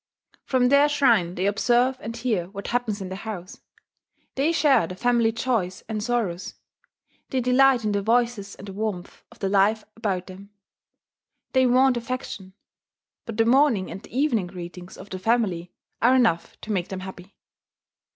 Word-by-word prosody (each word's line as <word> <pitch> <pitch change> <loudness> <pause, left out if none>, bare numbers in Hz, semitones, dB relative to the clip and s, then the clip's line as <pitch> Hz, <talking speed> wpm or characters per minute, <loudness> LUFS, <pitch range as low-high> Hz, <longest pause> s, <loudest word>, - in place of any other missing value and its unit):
From 250 -2 +2
their 280 +2 +5
shrine 235 -12 +3
they 185 - -1
observe 245 +5 +2
and 230 +2 -6
hear 220 -8 -1
what 200 0 -7
happens 230 -4 -1
in 190 - -5
the 190 - -5
house; 195 -4 -7 0.7
they 285 +5 +1
share 285 - +3
the 185 - -7
family 235 +1 +2
joys 225 -6 -2
and 215 -1 -3
sorrows; 210 -6 -2 0.7
they 260 - 0
delight 250 -1 +4
in 210 - +1
the 200 0 0
voices 230 -2 0
and 200 - -11
the 195 - -7
warmth 200 -3 -4
of 235 - -17
the 195 - -2
life 205 +2 +3
about 195 -5 -2
them. 195 +1 -12 1.0
They 260 -1 +4
want 255 +1 +4
affection; 230 -6 -5 0.7
but 225 -2 -6
the 225 - +3
morning 240 -5 +3
and 195 - -7
the 245 - -9
evening 245 -10 +1
greetings 175 0 -9
of - - -12
the 185 - -4
family 190 -5 0 0.3
are 245 +3 +5
enough 225 -10 +1
to 220 - -6
make 180 -4 -1
them 190 -1 -6
happy. 190 0 -10
220 Hz, 170 wpm, -24 LUFS, 190-245 Hz, 1.0 s, their